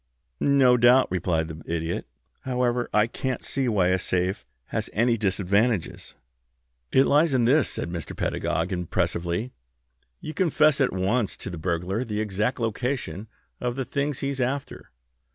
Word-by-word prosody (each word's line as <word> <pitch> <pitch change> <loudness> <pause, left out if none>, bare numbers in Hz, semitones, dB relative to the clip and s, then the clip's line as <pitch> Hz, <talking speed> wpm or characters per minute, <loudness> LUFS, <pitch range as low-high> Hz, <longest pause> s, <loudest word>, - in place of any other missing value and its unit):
"No 135 -3 +4
doubt," 125 0 +5
replied 85 -3 0
the 80 0 -8
Idiot. 85 0 -2 0.3
"However, 125 -1 -1
I 105 0 +4
can't 130 +2 -4
see 135 -2 -1
why 100 -6 +2
a 95 0 +2
safe 90 +2 -1 0.2
has - - -2
any 120 +3 +3
disadvantages." 100 0 0 0.8
"It 135 - +5
lies 150 0 +3
in 120 -2 +3
this," 140 +3 +4
said 85 - -4
Mr. 85 -3 -6
Pedagog, 80 +4 -1
impressively. 85 +4 -1 0.7
"You 155 - -7
confess 155 -5 +3
at 135 - +3
once 100 +4 0
to 95 - -6
the 85 - -6
burglar 90 +6 -1
the 105 -4 -3
exact 110 +4 -1
location 115 - -2 0.3
of 125 -1 -2
the 135 -1 -3
things 140 +2 -2
he's 140 -1 -2
after. 135 +3 -3
115 Hz, 150 wpm, -25 LUFS, 90-130 Hz, 0.8 s, doubt